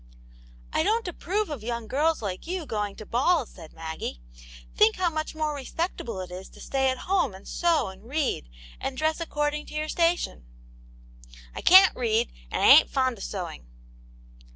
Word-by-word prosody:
" - - -24 0.3
I - - +2
don't 450 0 +1
approve 380 +2 -2
of 280 -7 -5
young 235 0 -4
girls 295 +4 +1
like 190 - -4
you 360 -2 -3
going 210 -5 -3
to 215 - -10
balls," 265 - +2
said 165 -4 -12
Maggie. 160 - -6 0.6
"Think 220 - +5
how 360 -2 +1
much 310 0 -4
more 310 -1 -1
re 280 - -6
spectable 240 - -3
it 180 - -16
is 185 +1 -8
to - - -16
stay 265 -1 0
at 260 - -1
home 360 - +1
and 190 - -13
sew 335 - +1
and 190 +5 -13
read, 275 - -1 0.3
and 270 -1 -4
dress 315 +2 0
according 300 -2 -2
to - - -10
your 305 0 -2
station." 335 - 0 0.9
V - - -18 0.2
I - - -6
can't 375 +2 +8
read, 230 -1 +1 0.2
and - - -1
I - - +7
ain't - - +9
fond 260 -4 0
of - - -7
sewing." 175 - -6
270 Hz, 190 wpm, -26 LUFS, 210-325 Hz, 0.9 s, ain't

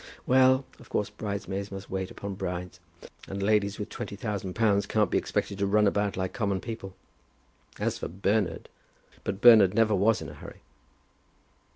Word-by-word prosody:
Well; 130 +1 +4
of - - -16
course 105 - -1
bridesmaids 100 -1 -4
must 95 0 -8
wait 95 0 -2
upon 100 0 -6
brides. 90 -1 -5 0.5
And 100 0 -4
ladies 100 -1 +2
with 105 -1 -5
twenty 105 -4 -6
thousand 100 -3 -4
pounds 105 -3 +2
can't 105 -1 +1
be - - +3
expected 100 - -3
to 100 - +1
run 105 +1 +4
about 100 0 0
like 95 -1 -2
common 100 -6 -1
people. 105 -3 -7 0.8
As - - -2
for - - -3
Bernard, 100 +2 -1 0.6
but 100 +1 -4
Bernard 110 -5 +8
never 110 -1 +3
was 105 +3 +3
in 80 - -7
a - - -10
hurry." 70 - -12
100 Hz, 170 wpm, -28 LUFS, 95-110 Hz, 0.8 s, Bernard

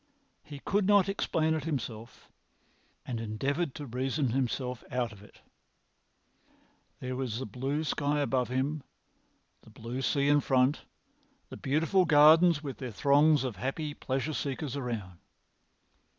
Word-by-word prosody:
He 145 - -10
could 200 +7 0
not 200 -2 +5
explain 160 -5 0
it 155 -1 -3
himself, 120 -6 -5 0.8
and 120 -3 -4
endeavoured 135 +8 -2
to 150 - -6
reason 130 +1 -1
himself 125 -1 -2
out 120 -3 -1
of 100 -2 -14
it. 105 - -18 1.6
There 130 0 -4
was 125 -4 -3
the 130 - -4
blue 135 +8 -3
sky 145 -1 0
above 130 -3 0
him, 135 +4 -1 0.8
the - - -18
blue 120 +3 -6
sea 140 +1 +1
in 145 0 +5
front, 135 +1 +1 0.6
the - - -8
beautiful 165 +6 +2
gardens 160 +1 +6
with 140 -3 -6
their 130 -3 -5
throngs 140 +6 +4
of 125 -7 -4
happy 145 - -3
pleasure 135 +2 -3
seekers 140 -1 -3
around. 110 -10 -5
135 Hz, 135 wpm, -30 LUFS, 125-150 Hz, 1.6 s, gardens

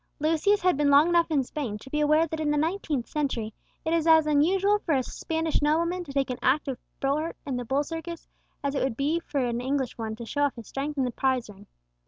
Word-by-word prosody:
Lucius 325 +7 +2
had 365 -5 +3
been 290 -1 +2
long 285 +4 +6
enough 340 -1 +3
in 290 -4 +2
Spain 250 -6 -4
to 265 - -13
be 300 - 0
aware 305 +2 +4
that 320 0 -5
in 310 -1 0
the 295 - +2
nineteenth 310 -5 -1
century 245 -8 -2 0.3
it 320 - +1
is 335 -1 +1
as 320 -1 +6
unusual 375 +8 +3
for 325 -7 0
a 260 - +1
Spanish 320 +4 -2
nobleman 335 +4 +1
to 295 - -9
take 275 -1 0
an 250 - -5
active 265 -1 +1 0.2
part 300 +4 -1
in 275 -3 -2
the 245 0 -3
bull 270 +4 +1
circus, 330 +2 -7 0.4
as 280 -1 -1
it 280 - -1
would 260 -4 -1
be 300 +5 +1
for 285 -6 -2
an 240 0 -2
English 265 -1 -2
one 220 -1 -3
to 235 +1 -8
show 290 +5 -2
off 285 -3 +2
his 230 -3 -10
strength 285 +2 -4
in 270 - +2
the 250 - -1
prize 255 -3 0
ring. 200 +1 -16
290 Hz, 245 wpm, -27 LUFS, 260-320 Hz, 0.4 s, long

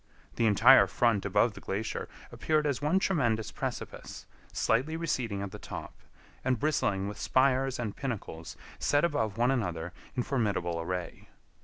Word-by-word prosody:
The 115 - +2
entire 110 +6 +7
front 115 -5 +1
above 105 +3 +2
the - - -11
glacier 105 +3 -3 0.2
appeared 155 -1 0
as 140 -2 0
one 150 +6 +2
tremendous 120 - +1
precipice, - - -6 0.3
slightly 135 +8 +1
receding 120 -11 -2
at 100 - -5
the 105 - -8
top, 90 - -7 0.5
and 130 -3 +1
bristling 100 -10 0
with 105 - -6
spires 130 0 +2
and 110 -4 -4
pinnacles 100 -11 -5 0.2
set 145 +3 +3
above 110 - -1
one 120 +2 +3
another 90 -9 -2 0.2
in 125 - 0
formidable 100 -11 -1
array. 90 0 -5
115 Hz, 150 wpm, -30 LUFS, 100-135 Hz, 0.5 s, entire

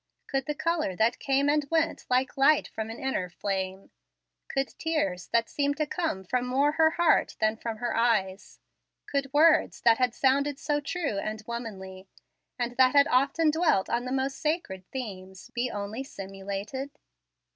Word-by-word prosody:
Could 270 -1 -2
the 295 - -2
color 320 - -1
that 225 +5 +1
came 275 +1 +1
and 295 +1 +3
went 325 0 0
like 255 +1 +1
light 280 +2 +4
from 220 0 -5
an 225 - -7
inner 255 -10 -2
flame, 190 +1 -4 0.6
could 270 -1 -1
tears 200 - -1
that 230 0 +1
seemed 285 0 -1
to 305 - +1
come 295 - -3 0.2
more 270 +4 +2
from - - -10
her 320 -1 +6
heart 345 -2 +3
than 215 0 +2
from 225 0 -5
her 240 +1 -2
eyes, 205 -5 0 0.5
could 275 -1 -2
words 310 +3 +4
that 230 0 +5
had 250 -2 +1
sounded 280 +1 +2
so 295 0 -1
true 290 - -2
and 215 +1 -4
womanly, 195 -5 -7 0.5
and 245 -1 -3
that 260 +1 +5
had 280 0 +6
often 280 +5 +3
dwelt 310 - +2
on 240 +1 0
the 255 - -4
most 270 +1 -1
sacred 255 - -2
themes, 190 -7 -7
be 245 +1 -1
only 210 +4 -4
simulated? 200 +4 -6
255 Hz, 165 wpm, -28 LUFS, 205-285 Hz, 0.6 s, her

